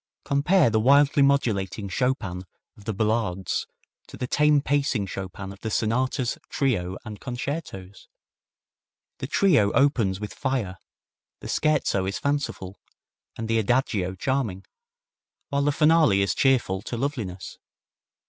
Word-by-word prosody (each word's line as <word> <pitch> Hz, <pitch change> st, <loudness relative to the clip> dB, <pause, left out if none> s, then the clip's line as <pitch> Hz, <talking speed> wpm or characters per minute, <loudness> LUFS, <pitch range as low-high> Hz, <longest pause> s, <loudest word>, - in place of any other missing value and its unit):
Compare 145 Hz, 0 st, +3 dB
the 110 Hz, -, +2 dB
wildly 140 Hz, +4 st, +4 dB
modulating 110 Hz, -8 st, +1 dB
Chopin 95 Hz, -4 st, -1 dB, 0.3 s
of 105 Hz, -, -17 dB
the 110 Hz, -, -1 dB
ballades 105 Hz, -3 st, -1 dB, 0.4 s
to -, -, -11 dB
the -, -, -3 dB
tame 150 Hz, +3 st, +3 dB
pacing 140 Hz, -7 st, 0 dB
Chopin 95 Hz, +1 st, -7 dB
of 100 Hz, -, -16 dB
the 110 Hz, -, -4 dB
sonatas, 120 Hz, +3 st, 0 dB
trio 95 Hz, -10 st, -1 dB
and 105 Hz, -1 st, -8 dB
concertos! 120 Hz, -, -6 dB, 1.1 s
The 130 Hz, -, -4 dB
trio 150 Hz, -, +3 dB
opens 115 Hz, -10 st, +2 dB
with 105 Hz, -1 st, -6 dB
fire, 125 Hz, -10 st, -2 dB, 0.6 s
the -, -, -8 dB
scherzo 150 Hz, -11 st, +1 dB
is 100 Hz, -, -2 dB
fanciful, 140 Hz, -9 st, -3 dB, 0.6 s
and 115 Hz, -, -4 dB
the 115 Hz, 0 st, +2 dB
adagio 105 Hz, -5 st, 0 dB
charming, 110 Hz, -4 st, -2 dB, 0.8 s
while 140 Hz, 0 st, 0 dB
the 145 Hz, +1 st, +2 dB
finale 150 Hz, -9 st, +4 dB
is 100 Hz, -, 0 dB
cheerful 120 Hz, -8 st, +2 dB
to 120 Hz, -, -5 dB
loveliness. 115 Hz, -, -4 dB
115 Hz, 130 wpm, -25 LUFS, 95-140 Hz, 1.1 s, wildly